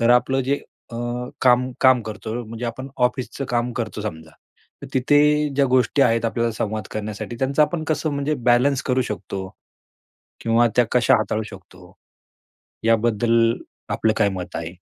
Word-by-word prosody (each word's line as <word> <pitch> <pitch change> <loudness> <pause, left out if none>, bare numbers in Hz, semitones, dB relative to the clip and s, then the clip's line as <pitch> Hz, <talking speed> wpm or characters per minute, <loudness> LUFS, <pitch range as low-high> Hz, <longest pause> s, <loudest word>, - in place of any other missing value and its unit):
तर 115 +1 +3
आपलं 130 +2 +3
जे 140 +2 -1 0.3
अ, 115 - -6 0.4
काम 125 0 +4
काम 130 -2 +5
करतो 110 0 -6
म्हणजे 115 +2 -7
आपण 130 +4 -5 0.2
ऑफिसच 130 +2 -6
काम 120 0 0
करतो 110 -2 -4
समजा. 80 -6 -6 0.5
तर - - -6
तिथे 130 +3 +4 0.4
ज्या 140 - +4
गोष्टी 130 +2 +3
आहेत 115 -1 +2
आपल्याला 115 0 0
संवाद 110 -1 -3
करण्यासाठी 110 +1 -5
त्यांचा 140 +3 +2
आपण 160 +1 -1
कसं 155 0 -1
म्हणजे 140 +1 -1
बॅलन्स 130 +3 +3
करू 130 0 +1
शकतो? 100 -3 -5 0.9
किंवा 115 +1 +3
त्या 125 - +5
कशा 125 -2 +4
हाताळू 110 0 -1
शकतो? 95 -2 -14 0.9
याबद्दल 115 0 +3 0.4
आपलं 110 -1 +1
काय 105 -2 +3
मत 90 -2 -6
आहे? 85 +2 -5
115 Hz, 155 wpm, -22 LUFS, 110-130 Hz, 0.9 s, काम